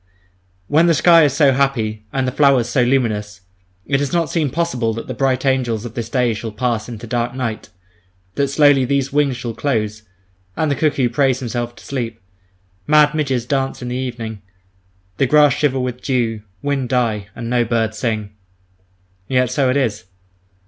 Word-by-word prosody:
When 160 +7 +4
the 165 - +4
sky 165 +1 +6
is 140 - +1
so 140 -1 +4
happy, 115 -6 -1
and 135 -1 -1
the - - 0
flowers 135 -3 +3
so 125 +1 +1
luminous, 110 -6 0 0.4
it 135 -1 +1
does 140 -2 -2
not 170 -2 0
seem 155 -4 0
possible 125 -8 -1
that 115 - -6
the - - -5
bright 130 -1 0
angels 120 -4 0
of 115 - -7
this 115 -1 -5
day 125 -2 +1
shall 110 +1 -5
pass 115 0 -2
into 120 -1 -8
dark 120 +1 -2
night, 120 -4 -4 0.6
that 140 +8 0
slowly 145 -1 +4
these 135 +1 -1
wings 140 -3 +1
shall 120 -2 -5
close, 110 -5 -2 0.6
and 155 -2 +1
the - - +1
cuckoo 140 -5 +1
praise 130 +1 +2
himself 120 -1 -4
to - - -15
sleep, 115 -4 -4 0.7
mad 150 0 +5
midges 135 -6 -1
dance 135 -1 -2
in 125 - -4
the 125 - -3
evening; 115 -5 -5 0.8
the 135 - +2
grass 150 0 +5
shiver 140 -2 0
with 125 -1 -3
dew, 115 -5 -1 0.2
wind 140 -3 -1
die, 115 -5 0
and 115 - -6
no 120 0 +2
bird 115 -1 0
sing.... 110 -2 -3 1.0
Yet 125 -2 +1
so 135 -4 +1
it 130 - +2
is. 115 -5 -1
125 Hz, 180 wpm, -19 LUFS, 115-140 Hz, 1.0 s, sky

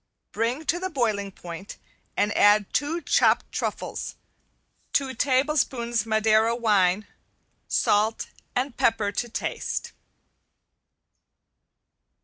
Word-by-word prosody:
Bring 240 +8 -1
to 350 - +1
the 375 +1 -3
boiling 215 - -1
point 175 +1 -9 0.4
and 205 0 +1
add 205 0 +4
two 315 +4 0
chopped 290 - +2
truffles, - - -4 0.8
two 270 -2 +1
tablespoons 255 -4 +1
Madeira 220 +1 +3
wine, 205 -4 +2 0.6
salt 215 +2 +1 0.3
and 250 0 -1
pepper 220 -3 +1
to 240 +3 -3
taste. - - -3
225 Hz, 95 wpm, -25 LUFS, 210-260 Hz, 0.8 s, add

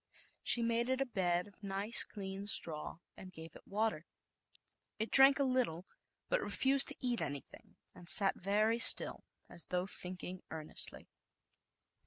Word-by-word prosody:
She 235 - +1
made 235 +1 -2
it 260 0 -2
a 270 - -1
bed 180 -6 -3
of 205 - -22
nice 200 +3 +2
clean 195 -1 -9
straw 160 -6 +2 0.2
and 185 - -13
gave 160 -2 -13
it - - -17
water. 205 -5 -3 0.9
It 220 +1 -4
drank 270 +1 +7
a 280 - 0
little, 250 -10 -2 0.4
but - - -1
re - - -6
fused 270 +1 +3
to - - -7
eat 245 -3 -3
anything, 140 -2 -8 0.2
and 175 - -5
sat 195 -1 +5
very 215 +4 -1
still, - - +6 0.2
as 170 - -7
though 180 0 -3
thinking 185 -1 -8
earnestly. 155 -1 -7
200 Hz, 155 wpm, -33 LUFS, 180-235 Hz, 0.9 s, drank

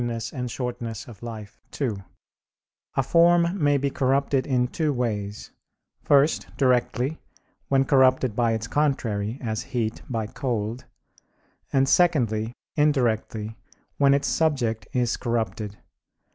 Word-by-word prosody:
et 120 - -1
Brev. 120 +1 -4 0.4
Vitae 115 -3 -6 0.5
ii), 100 - -9 0.9
a 135 - +2
form 170 +3 +3
may 145 0 +4
be 140 0 -1
corrupted 135 0 +1
in 125 -3 +2
two 155 +3 -1
ways; 105 -5 -3 0.5
first, 145 +2 +3
directly, 130 +2 +1 0.5
when 135 -1 +3
corrupted 130 -5 +3
by 115 -1 +2
its 110 0 -2
contrary, 115 -6 0
as 110 -1 -2
heat, 120 -4 -3
by 115 -3 -1
cold; 115 -1 -3 0.9
and 135 0 +3
secondly, 120 -11 +2 0.2
indirectly, 115 -7 +1 0.4
when 140 -1 +5
its 140 - 0
subject 130 -9 0
is 120 -2 0
corrupted. 110 -3 -2
125 Hz, 115 wpm, -25 LUFS, 110-140 Hz, 0.9 s, when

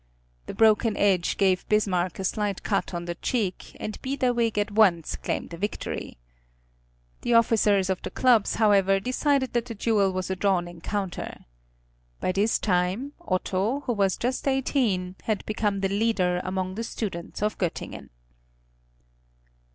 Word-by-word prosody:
The - - -6
broken 220 0 +4
edge 190 -4 +2
gave 190 -2 +2
Bismarck 185 -5 +1
a 190 - -4
slight 205 0 -1
cut 200 - -1
on 175 -1 -4
the 175 - -3
cheek, 200 -1 -3
and 215 - -5
Biederwig 245 -4 0
at 205 0 0
once 190 -7 +3
claimed - - -4
a - - -6
victory. 205 - -4 1.0
The 240 - +1
officers 210 -4 +4
of 190 -1 -1
the - - -5
clubs, 240 -5 +3
however, 195 -3 +4
decided 260 +3 0
that 240 -1 0
the 230 -2 -7
duel 205 -3 +2
was 185 0 -3
a - - 0
drawn 185 -2 +1
encounter. 175 +2 -5 0.7
By - - 0
this 200 +4 +2
time 190 +8 0
Otto, 200 +6 -1
who 250 - -1
was 195 -3 +1
just 255 +3 -2
eighteen, 235 -9 0
had 215 -2 -1
become 210 -2 -1
the 195 - +1
leader 195 -4 +1
among 185 0 -2
the 225 +4 -4
students 195 -5 -5
of 210 0 -1
Göttingen. 175 -4 -4
205 Hz, 150 wpm, -26 LUFS, 185-225 Hz, 1.0 s, broken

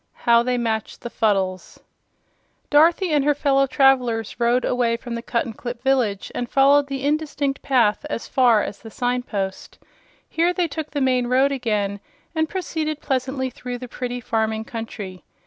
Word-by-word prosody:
12. - - -17
How 235 0 +6
they 250 +1 0
Matched 220 -2 -2
the 240 - -6
Fuddles 190 -4 -1 0.9
Dorothy 330 +4 +4
and 295 -2 +3
her 295 0 +2
fellow 275 -1 +2
travelers 250 -6 +2
rode 240 +2 +2
away 240 -2 +1
from 240 0 -7
the 235 - -3
Cuttenclip 235 +1 -4
village 250 -7 +1
and 245 -1 -3
followed 280 +1 +4
the 270 -1 -4
indistinct 290 -2 -1
path 235 -5 +2
as 230 - -4
far 240 -5 +4
as 200 - -6
the 225 - -11
sign 245 +2 -1
post. 195 -5 -5 0.5
Here 340 +2 +1
they 355 -2 0
took 305 0 -5
the 285 - -3
main 255 -2 +2
road 260 +3 +3
again 210 -6 -1 0.3
and 315 -1 0
proceeded 315 -5 -3
pleasantly 260 -1 -2
through 250 0 -6
the 250 +1 -8
pretty 245 0 -4
farming 220 -1 -1
country. 210 -5 -7
250 Hz, 165 wpm, -22 LUFS, 230-280 Hz, 0.9 s, How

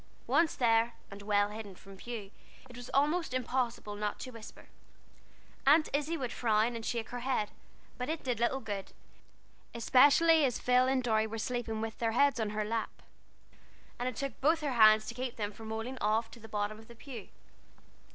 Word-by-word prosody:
Once 310 +5 +2
there, 230 -1 +3 0.2
and 200 0 -9
well 205 0 +2
hidden 210 -2 -8
from 195 +2 -14
view, 210 -1 -7 0.4
it 245 - -13
was 245 0 -9
almost 300 +1 +1
impossible 245 -4 -2
not 210 0 -3
to 255 - -7
whisper. 230 -2 -12 1.0
Aunt 305 +2 +6
Izzie 300 +4 0
would 255 -5 -3
frown 225 0 +1
and 230 - -5
shake 230 -1 -3
her 245 - -5
head, 245 -4 -1 0.5
but 250 - -3
it 320 0 -3
did 245 -4 -1
little 250 +3 +1
good, 205 -4 -5 0.8
especially 290 +7 +5
as 250 -4 +1
Phil 250 +1 +3
and 260 -1 +1
Dorry 220 -2 +2
were 225 +1 -5
sleeping 225 -1 -3
with 225 0 -5
their 225 -1 0
heads 280 +1 +3
on 220 -2 0
her 210 0 -2
lap, 225 +1 -3 1.0
and 245 +1 0
it 255 - -8
took 275 -4 -5
both 320 +4 +3
her 290 -3 -1
hands 215 -2 +6
to - - -5
keep 250 0 -4
them 205 -2 -3
from 220 +1 -10
rolling 225 +4 -4
off 215 +2 +2
into 235 - -13
the 225 0 -12
bottom 210 +1 -2
of 220 - -15
the 235 - -13
pew. 235 -4 -9
235 Hz, 190 wpm, -32 LUFS, 220-260 Hz, 1.0 s, Aunt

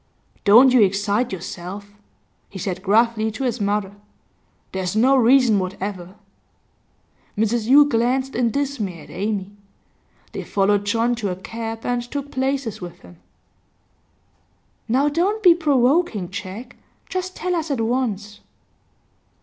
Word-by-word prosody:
'Don't 240 +6 +7
you 250 - +6
excite 205 +4 +1
yourself,' 190 +2 -7 0.6
he 195 - -9
said 185 0 -4
gruffly 220 +2 +2
to 225 +5 -5
his 245 -3 -2
mother. 200 -1 -1 0.8
'There's 190 0 -3
no 255 +5 +4
reason 250 -3 +4
whatever.' 185 0 -5 1.2
Mrs 220 +1 0
Yule 285 +3 +7
glanced 260 +1 0
in 240 -1 +1
dismay 225 - -3
at - - -14
Amy. 200 0 -3 0.8
They - - -6
followed 205 0 +1
John 230 +3 +1
to 210 -4 -2
a 180 - -3
cab, 225 +4 -7
and 245 -1 0
took 280 +4 -6
places 265 -5 -2
with 175 -1 -9
him. 90 0 -16 1.7
'Now 265 +5 +2
don't 375 +9 0
be 355 -3 +8
provoking, 275 - +1
Jack. 210 +6 -8 0.3
Just 370 0 -4
tell 360 +2 -2
us 330 -2 -2
at 275 -4 -1
once. 225 -3 -2
225 Hz, 130 wpm, -21 LUFS, 200-265 Hz, 1.7 s, be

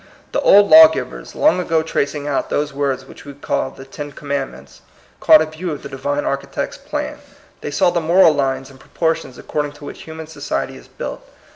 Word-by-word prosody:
The - - 0
old 205 0 +6
law 320 +4 +10
givers, 320 - -6
long 300 -10 +3
ago 165 -3 +1
tra 160 - 0
cing 145 0 -7
out 145 -2 -1
those 150 0 -1
words 135 -2 -2
which - - -14
we 140 -1 -10
call 140 -1 -2
the 135 0 -12
Ten 145 +2 -8
Commandments, 140 -1 -6 0.4
caught 155 - +7
a - - -3
view 160 +3 -6
of 145 - -6
the 140 - -7
Divine 145 +2 -2
Architect's 140 - -3
plan. - - -5 0.4
They - - -4
saw 175 +4 +2
the 175 -1 0
moral 165 0 +5
lines 135 -1 -2
and 130 - -17
proportions 160 -4 -2
accord 150 -1 -3
ing - - -10
to 145 0 -12
which - - -9
human 160 0 -8
society 160 - -4
is - - -14
built. - - -7
145 Hz, 210 wpm, -19 LUFS, 140-165 Hz, 0.4 s, law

